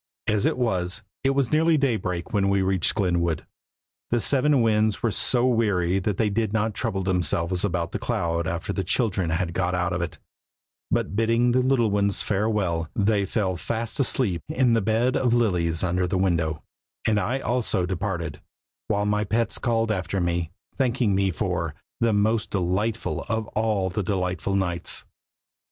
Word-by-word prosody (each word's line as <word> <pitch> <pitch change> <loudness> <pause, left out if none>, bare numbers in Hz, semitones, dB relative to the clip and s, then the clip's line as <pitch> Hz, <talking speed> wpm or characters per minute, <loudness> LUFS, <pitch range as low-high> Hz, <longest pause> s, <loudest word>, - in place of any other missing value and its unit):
As 105 -2 +2
it - - 0
was, 95 -7 -1 0.2
it 135 0 +2
was 135 -4 +1
nearly 160 +1 +4
daybreak 100 -11 -1
when 100 -2 +2
we 100 -1 +2
reached 95 -2 +1
Glenwood. 85 -5 0 0.6
The 120 - +2
seven 140 +1 +3
Winds 110 -1 +1
were 115 - +2
so 120 +4 +3
weary 100 -7 +2
that 95 0 -2
they 110 - +2
did 110 0 -1
not 110 0 0
trouble 95 +2 -2
themselves 90 -1 +1
about 85 -4 -1
the - - -3
cloud 85 -8 -1
after 85 +4 -3
the 95 - -2
children 95 -2 0
had 85 +1 -1
got 90 0 0
out 90 -1 0
of 85 - -1
it, 85 -2 -4 0.7
but - - -1
bidding 115 +2 +2
the 130 +1 +3
little 125 -4 +2
ones 100 -1 +1
farewell, 95 -6 0
they 100 -1 +2
fell 95 -2 -1
fast 115 - -4
asleep 115 -9 +1
in 125 -2 +2
the 115 - +3
bed 115 +5 +1
of 120 -2 +2
lilies 90 -8 +1
under 90 0 +1
the 95 +1 -1
window; 85 -5 0 0.4
and 105 -2 +2
I 120 +7 -1
also 120 -7 0
departed, 90 -4 -3 0.5
while 105 -1 0
my 105 0 +1
pets 115 +2 0
called 115 -2 +1
after 95 -1 -2
me, 85 -2 -1 0.3
thanking 120 -5 +2
me 95 0 +2
for 85 -4 -2 0.2
"the 115 -1 +2
most 110 +2 +1
delightful 100 +4 -1
of 110 -1 -1
all 105 -4 0
the 105 - -1
delightful 95 0 -1
nights!" 90 -3 0
100 Hz, 170 wpm, -25 LUFS, 90-115 Hz, 0.7 s, nearly